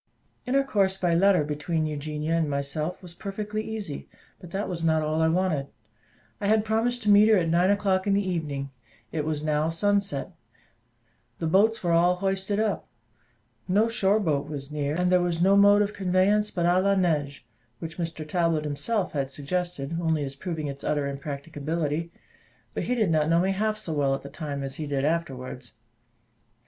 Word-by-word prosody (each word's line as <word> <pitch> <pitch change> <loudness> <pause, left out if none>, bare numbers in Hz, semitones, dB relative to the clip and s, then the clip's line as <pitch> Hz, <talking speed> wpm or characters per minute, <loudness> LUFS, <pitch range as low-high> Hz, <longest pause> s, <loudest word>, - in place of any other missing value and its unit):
Intercourse 215 -8 +2
by 175 -3 +1
letter 185 -1 +4
between 150 +2 -2
Eugenia 150 +1 -2
and 160 -3 +1
myself 150 +6 -3
was 175 -2 -11
perfectly 210 +3 -4
easy; 205 - -5 0.3
but 175 - -11
that 195 +4 -3
was 170 -2 -4
not 160 -1 +2
all 155 +1 0
I 160 - +4
wanted. 160 -5 +1 0.7
I 200 - -1
had 215 0 +3
promised 225 +2 0
to 210 - +4
meet 205 +1 +7
her 215 - +6
at 165 -3 +1
nine 175 +3 +3
o'clock 200 -1 +1
in 200 - +3
the 200 -1 0
evening. 145 -6 -3 0.4
It 150 -2 -2
was 155 -1 -2
now 155 +1 +1
sunset; 200 -3 0 1.1
the 165 - -3
boats 205 +7 +3
were 175 - +1
all 175 +2 +4
hoisted 195 +2 -1
up; 215 -2 -1 0.8
no 205 +5 +3
shore 215 -3 +2
boat 150 -8 0
was 145 -1 -7
near, 145 0 -1
and 180 +1 +1
there 180 -1 +5
was 175 -1 -1
no 190 +3 +5
mode 205 +1 +6
of 205 +1 -3
conveyance 195 +3 +2
but 175 -3 -1
à 175 +2 +4
la 200 +1 +3
nage, 150 -6 0 0.4
which 160 +6 -8
Mr 165 -2 -4
Talbot 165 -2 +1
himself 180 +7 -1
had 135 -3 -2
suggested 165 +1 -3
only 160 -3 +1
as 135 -1 -5
proving 160 0 -4
its 140 -1 -6
utter 145 -1 0
impracticability; 150 +3 -3 0.6
but - - -3
he 250 - 0
did 215 -8 +2
not 155 -1 +2
know 165 0 +4
me 190 +2 +2
half 215 +2 0
so 165 -6 -5
well 140 -2 +1
at - - -8
the 140 - -8
time 145 -1 -5
as 135 0 -6
he 155 - -4
did 140 -1 -1
afterwards. 130 -6 -3
170 Hz, 185 wpm, -26 LUFS, 150-195 Hz, 1.1 s, meet